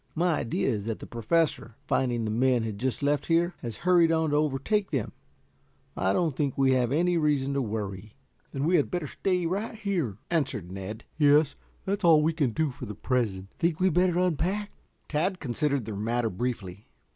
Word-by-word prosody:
"My 170 -1 +2
idea 115 - -1
is 105 -6 -1
that 115 -1 -2
the - - -9
Professor, 120 -1 0
finding 120 -3 0
the 110 - -2
men 125 +1 +2
had 110 -3 -4
just 130 +3 -2
left 145 0 +1
here, 170 +1 +2
has 115 -4 -6
hurried 175 -2 +5
on 160 -2 +1
to - - +2
overtake 155 +8 +1
them. 135 -8 -2 0.8
I 95 - +1
don't 160 - +1
think 140 -2 -1
we 135 -1 +4
have 125 -2 +2
any 175 +4 +2
reason 145 -3 +1
to 140 - 0
worry." 105 -2 -5 0.4
"Then 135 - -3
we 175 +4 +4
had - - +1
better 175 -3 -2
stay 180 +4 -1
right 200 +7 -2
here," 180 - -2
answered 130 - -1
Ned. 95 +4 -6 0.2
"Yes. 145 0 +5 0.3
That 200 +1 -1
is - - -17
all 160 -3 +6
we 160 +2 +2
can 150 -5 +1
do 155 +5 -1
for 125 - -8
the 105 - -6
present." 105 -6 -1
"Think 165 -1 +1
we 185 - +2
had 190 - +3
better 180 0 +3
unpack?" 185 +4 0 0.4
Tad 180 +5 0
considered 140 -1 -1
the 110 -2 -5
matter 115 +3 -1
briefly. 105 -2 -4
140 Hz, 200 wpm, -27 LUFS, 115-170 Hz, 0.8 s, all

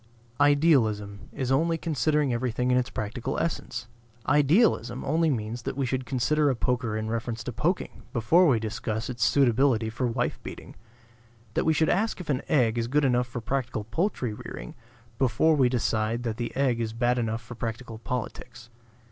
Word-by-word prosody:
Idealism 130 -9 +2
is 130 -1 -3
only 165 +5 +2
considering 150 -3 +1
everything 125 +1 0
in 125 - +4
its 125 +1 0
practical 120 +5 -4
essence. 120 -7 -3 0.4
Idealism 145 - +3
only 160 +3 +2
means 115 -2 -2
that 125 - -5
we 135 - 0
should 130 0 -2
consider 145 +3 +2
a 135 - +1
poker 120 -1 -1
in 110 0 -3
reference 115 0 -3
to 125 - -5
poking 170 - -2
before 145 +9 +4
we 130 -6 +4
discuss 110 +1 -3
its 120 -2 -2
suitability 120 -2 +3
for 125 +2 -1
wife 120 +1 -1
beating; - - -9 0.8
that - - 0
we 160 - +4
should 160 0 +2
ask 215 +6 +1
if 170 -5 -3
an 135 0 0
egg 120 -5 +3
is 115 - -1
good 145 +3 +2
enough 125 -1 +2
for 120 0 -6
practical 120 -3 -2
poultry 125 - -1
rearing - - -8 0.5
before 135 +5 +3
we 130 -4 +4
decide 115 -1 0
that 115 -2 -3
the 120 -1 -3
egg 130 -3 +1
is 110 -1 -2
bad 120 +1 +1
enough 115 0 -2
for 115 - -9
practical 115 0 -5
politics. 120 -1 -6
125 Hz, 175 wpm, -27 LUFS, 115-140 Hz, 0.8 s, in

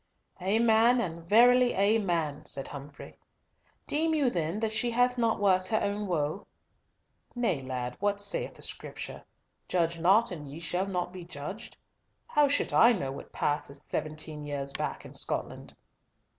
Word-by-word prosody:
"Amen, 225 +5 +4
and 170 -6 -3
verily 245 +3 +6
amen," 180 -8 +1
said 135 -1 +1
Humfrey. 145 0 -10 0.7
"Deem 320 +2 +1
you 280 -5 +2
then 170 +2 -2
that 220 -1 0
she 230 +2 +1
hath 245 +1 +2
not 230 -3 +1
worked 185 -2 +3
her 215 +3 +1
own 205 +1 -2
woe?" 160 +1 -2 0.9
"Nay, 210 - 0
lad, 125 -1 -4
what 205 0 0
saith 205 0 -1
the - - -5
Scripture, - - -5 0.4
'Judge 170 -2 0
not, 195 +7 +4
and 150 -5 -7
ye 150 - -8
shall 175 +4 -1
not 180 -2 -3
be 185 -1 -8
judged'? 170 +5 -8 0.5
How 295 -11 +3
should 285 +1 0
I 235 +2 +7
know 140 -11 -3
what 140 - -8
hath - - -31
passed 145 -1 -2
seventeen 155 0 -4
years 140 -1 -4
back - - -4
in - - -11
Scotland?" - - -4
185 Hz, 155 wpm, -29 LUFS, 155-225 Hz, 0.9 s, I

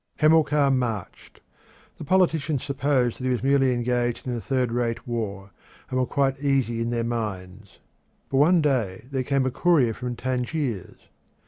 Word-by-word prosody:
Hamilcar 150 -2 +4
marched. 120 -7 -3 0.6
The - - -6
politicians 160 -4 +1
supposed 135 -3 0
that - - -7
he 130 - 0
was 125 -1 -1
merely 135 -1 +3
engaged 120 0 -1
in 125 -2 -2
a 115 - -4
third 130 -2 -1
rate 120 -1 -2
war, 100 -4 -4 0.4
and 130 - 0
were 125 - +1
quite 135 -1 0
easy 135 -5 0
in 115 - -1
their 120 -1 -1
minds. 105 -4 -5 0.5
But 135 - +1
one 160 +4 +4
day 115 -9 -1
there 135 -1 -1
came 135 0 0
a 130 - 0
courier 145 -8 +3
from 125 +1 -5
Tangiers. 125 - -3
125 Hz, 160 wpm, -25 LUFS, 115-140 Hz, 0.6 s, Hamilcar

